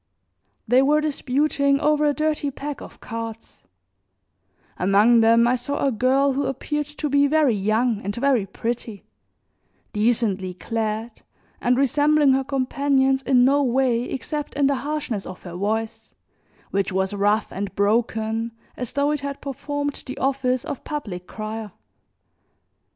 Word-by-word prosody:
They 250 Hz, +3 st, +5 dB
were 295 Hz, +3 st, +4 dB
disputing 280 Hz, -1 st, +1 dB
over 300 Hz, +1 st, +2 dB
a 295 Hz, -, +4 dB
dirty 305 Hz, -1 st, 0 dB
pack 280 Hz, +1 st, -6 dB
of -, -, -12 dB
cards; 225 Hz, -1 st, -7 dB, 1.1 s
among 205 Hz, +6 st, +4 dB
them 230 Hz, +1 st, +5 dB
I 250 Hz, -, +3 dB
saw 280 Hz, +4 st, -2 dB
a 275 Hz, -, +2 dB
girl 265 Hz, +4 st, +2 dB
who 275 Hz, 0 st, -1 dB
appeared 295 Hz, +2 st, -3 dB
to 300 Hz, 0 st, -4 dB
be 285 Hz, 0 st, +3 dB
very 300 Hz, -4 st, +3 dB
young 215 Hz, +2 st, +1 dB
and 200 Hz, +1 st, -4 dB
very 245 Hz, -5 st, +1 dB
pretty, 225 Hz, 0 st, -5 dB, 0.9 s
decently 210 Hz, -4 st, 0 dB
clad, 220 Hz, +2 st, -3 dB, 0.4 s
and 245 Hz, +1 st, +2 dB
resembling 290 Hz, +2 st, +3 dB
her 265 Hz, 0 st, +2 dB
companions 270 Hz, 0 st, +1 dB
in 250 Hz, -2 st, +4 dB
no 280 Hz, +2 st, +4 dB
way, 255 Hz, -2 st, +2 dB
except 295 Hz, +3 st, -4 dB
in 285 Hz, -1 st, +2 dB
the 275 Hz, 0 st, +2 dB
harshness 280 Hz, -8 st, -3 dB
of 185 Hz, -, -9 dB
her 175 Hz, -, -8 dB
voice, 215 Hz, +4 st, -3 dB, 0.6 s
which 195 Hz, 0 st, 0 dB
was 190 Hz, +1 st, 0 dB
rough 205 Hz, +2 st, +1 dB
and 195 Hz, 0 st, -5 dB
broken 220 Hz, +2 st, 0 dB, 0.2 s
as 250 Hz, -2 st, -5 dB
though 285 Hz, +1 st, +1 dB
it 300 Hz, -, -1 dB
had 280 Hz, 0 st, -5 dB
performed 285 Hz, +1 st, -4 dB
the 260 Hz, +2 st, -6 dB
office 265 Hz, -2 st, 0 dB
of 275 Hz, -, -5 dB
public 200 Hz, -12 st, -5 dB
crier. 215 Hz, -2 st, -6 dB
255 Hz, 145 wpm, -23 LUFS, 220-280 Hz, 1.1 s, They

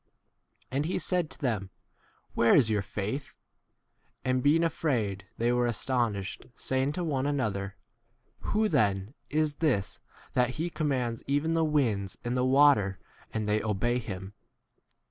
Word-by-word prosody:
25 130 Hz, -, -6 dB
And 145 Hz, +2 st, +1 dB
he 175 Hz, -, -1 dB
said 180 Hz, -4 st, +1 dB
to -, -, -8 dB
them, 110 Hz, -8 st, -1 dB, 0.6 s
Where 115 Hz, -, +5 dB
is 115 Hz, -6 st, +5 dB
your 105 Hz, -2 st, +2 dB
faith? 105 Hz, +8 st, -4 dB, 0.9 s
And, 130 Hz, 0 st, +2 dB
being 155 Hz, +5 st, +4 dB
afraid, 115 Hz, -, -1 dB
they 120 Hz, +1 st, +2 dB
were 120 Hz, 0 st, +2 dB
astonished, 115 Hz, -4 st, -1 dB
saying 130 Hz, +3 st, 0 dB
to 180 Hz, -, -2 dB
one 140 Hz, -4 st, 0 dB
another, 105 Hz, -9 st, -1 dB, 0.6 s
Who 215 Hz, +1 st, +1 dB
then 105 Hz, -, +1 dB, 0.2 s
is 150 Hz, -1 st, 0 dB
this, 130 Hz, -12 st, 0 dB, 0.3 s
that 125 Hz, 0 st, +2 dB
he 170 Hz, +2 st, -2 dB
commands 130 Hz, -8 st, -1 dB
even 145 Hz, +4 st, +1 dB
the 165 Hz, 0 st, +2 dB
winds 115 Hz, -, 0 dB
and 120 Hz, +1 st, -1 dB
the 125 Hz, -, +2 dB
water, 130 Hz, -8 st, +5 dB, 0.3 s
and 110 Hz, -1 st, -2 dB
they 105 Hz, +1 st, +2 dB
obey 115 Hz, +3 st, 0 dB
him? 95 Hz, -3 st, -6 dB
125 Hz, 145 wpm, -29 LUFS, 105-145 Hz, 0.9 s, Where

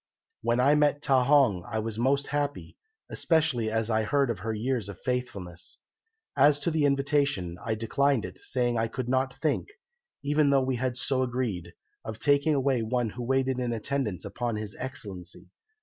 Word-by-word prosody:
"When 120 Hz, +1 st, +1 dB
I 135 Hz, +4 st, +5 dB
met 145 Hz, -1 st, +2 dB
Ta 130 Hz, -2 st, +4 dB
hong 135 Hz, -11 st, +4 dB
I -, -, -2 dB
was 110 Hz, 0 st, -3 dB
most 140 Hz, +3 st, +2 dB
happy, 145 Hz, 0 st, -3 dB, 0.4 s
especially 155 Hz, -9 st, +1 dB
as 110 Hz, +1 st, -1 dB
I 110 Hz, 0 st, +2 dB
heard 135 Hz, +3 st, +1 dB
of 115 Hz, -, -5 dB
her 110 Hz, -, -3 dB
years 115 Hz, 0 st, -2 dB
of 100 Hz, -, -9 dB
faithfulness. 100 Hz, -9 st, -4 dB, 0.6 s
As 145 Hz, +1 st, +5 dB
to 170 Hz, -, 0 dB
the 155 Hz, -2 st, +2 dB
invitation 140 Hz, -, +1 dB
I 110 Hz, -1 st, -1 dB
declined 125 Hz, +3 st, +1 dB
it, -, -, -9 dB
saying 120 Hz, -2 st, 0 dB
I 115 Hz, -, +1 dB
could 125 Hz, +2 st, -4 dB
not 130 Hz, +1 st, 0 dB
think, 155 Hz, -3 st, 0 dB, 0.6 s
even 145 Hz, 0 st, +3 dB
though 135 Hz, -1 st, +4 dB
we 130 Hz, -1 st, -1 dB
had 125 Hz, 0 st, -2 dB
so 130 Hz, +1 st, 0 dB
agreed, 115 Hz, -9 st, -2 dB, 0.3 s
of 110 Hz, -1 st, -6 dB
taking 145 Hz, +3 st, +3 dB
away 135 Hz, -3 st, +1 dB
one 115 Hz, 0 st, -1 dB
who 125 Hz, -, -7 dB
waited 130 Hz, +1 st, +1 dB
in 125 Hz, -1 st, -1 dB
attendance 115 Hz, -4 st, -2 dB
upon 120 Hz, -2 st, -3 dB
His 105 Hz, -1 st, -5 dB
Excellency. 100 Hz, -9 st, -7 dB
125 Hz, 180 wpm, -28 LUFS, 110-140 Hz, 0.6 s, I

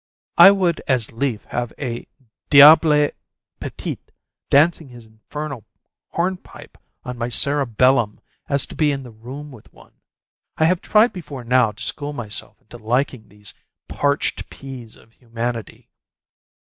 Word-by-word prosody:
I -, -, +11 dB
would 185 Hz, -4 st, +1 dB
as 125 Hz, -5 st, 0 dB
lief 115 Hz, -2 st, -2 dB
have 120 Hz, -1 st, -3 dB
a 120 Hz, -4 st, -5 dB, 0.4 s
diable 150 Hz, +1 st, +7 dB, 0.5 s
petit -, -, -6 dB, 0.5 s
dancing 155 Hz, +1 st, +3 dB
his 120 Hz, -2 st, -13 dB
infernal 125 Hz, +4 st, -8 dB, 0.5 s
hornpipe 180 Hz, +2 st, -4 dB, 0.3 s
on 125 Hz, -1 st, -6 dB
my 120 Hz, -, -2 dB
cerebellum 125 Hz, -3 st, +1 dB, 0.3 s
as 140 Hz, -2 st, +2 dB
to -, -, -11 dB
be 150 Hz, -2 st, +2 dB
in 135 Hz, -1 st, -4 dB
the 125 Hz, -, -11 dB
room 130 Hz, +7 st, -10 dB
with 120 Hz, -5 st, -16 dB
one. -, -, -20 dB, 0.6 s
I 160 Hz, -, +3 dB
have 180 Hz, +2 st, +2 dB
tried 220 Hz, +3 st, +3 dB
before 145 Hz, -8 st, -8 dB
now 120 Hz, -2 st, +3 dB
to 105 Hz, -, -7 dB
school 145 Hz, 0 st, -3 dB
myself 110 Hz, -6 st, -6 dB
into -, -, -13 dB
liking 120 Hz, 0 st, -1 dB
these 105 Hz, 0 st, -7 dB, 0.3 s
parched 145 Hz, 0 st, -1 dB
peas 130 Hz, -5 st, -10 dB
of 115 Hz, -, -21 dB
humanity. 115 Hz, -1 st, -6 dB
130 Hz, 135 wpm, -21 LUFS, 115-150 Hz, 0.6 s, I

